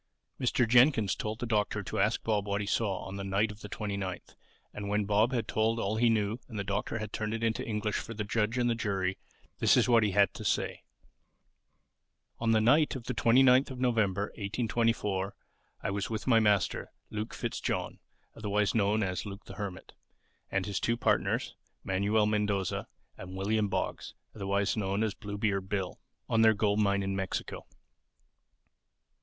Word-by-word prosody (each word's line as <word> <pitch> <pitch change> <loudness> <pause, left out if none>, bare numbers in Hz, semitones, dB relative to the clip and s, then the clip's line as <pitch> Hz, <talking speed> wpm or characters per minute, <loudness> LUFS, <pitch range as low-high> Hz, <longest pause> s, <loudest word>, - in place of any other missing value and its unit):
Mr. 125 -1 +2
Jenkyns 120 -3 +5
told 110 0 -4
the 120 - -4
Doctor 105 -3 0
to - - -4
ask - - +1
Bob 105 -2 0
what 100 0 0
he 105 - -2
saw 100 -2 0
on 95 +1 -6
the 100 - -4
"night 100 +3 +1
of 105 +1 -13
the 105 - -8
29th;" 100 -2 -4 0.4
and 100 -1 -5
when 105 0 +1
Bob 105 +4 +3
had 120 -3 -1
told 110 +1 +1
all 110 0 -1
he 120 +1 +4
knew 110 +1 +1
and 115 - -8
the 100 - -1
Doctor 100 +4 -2
had 110 -2 -6
turned 110 0 -2
it 115 - -4
into 115 -1 0
English 105 -1 -2
for 115 - -6
the 105 - -2
judge 110 +2 0
and 120 -1 +2
the 120 - +3
jury, 95 -4 -1 0.4
this - - +5
was - - +4
what 120 -2 +5
he 105 - +2
had 100 0 +3
to - - -8
say: 105 - -1 1.6
"On 115 - 0
the 110 -1 +5
night 140 +8 +4
of 130 - -6
the - - -3
29th 130 +2 +5
of 130 -2 -7
November, 105 -5 +1
1824, 105 -2 0 0.5
I - - -1
was 100 0 -2
with 110 -2 -3
my 115 -3 +5
master, 105 -3 +1 0.2
Luke 105 +1 -4
Fitzjohn - - -3 0.4
(otherwise 105 -2 0
known 105 0 +2
as 95 +2 -3
Luke 100 +1 -8
the - - -10
Hermit) 100 -3 -6 0.6
and 95 -1 0
his 100 -2 -2
two 115 0 0
partners, - - 0 0.3
Manuel 100 +3 +2
Mendoza 105 -3 0 0.3
and 95 0 -8
William 105 +2 +1
Boggs - - -3 0.2
(otherwise 100 0 0
known 100 0 0
as 110 -2 0
Bluebeard 100 -2 -2
Bill) 95 -3 -2 0.3
on 115 - +2
their 110 -1 +6
gold 105 0 +1
mine 100 -1 +2
in 95 0 -2
Mexico. 95 -1 -4
105 Hz, 180 wpm, -30 LUFS, 100-115 Hz, 1.6 s, their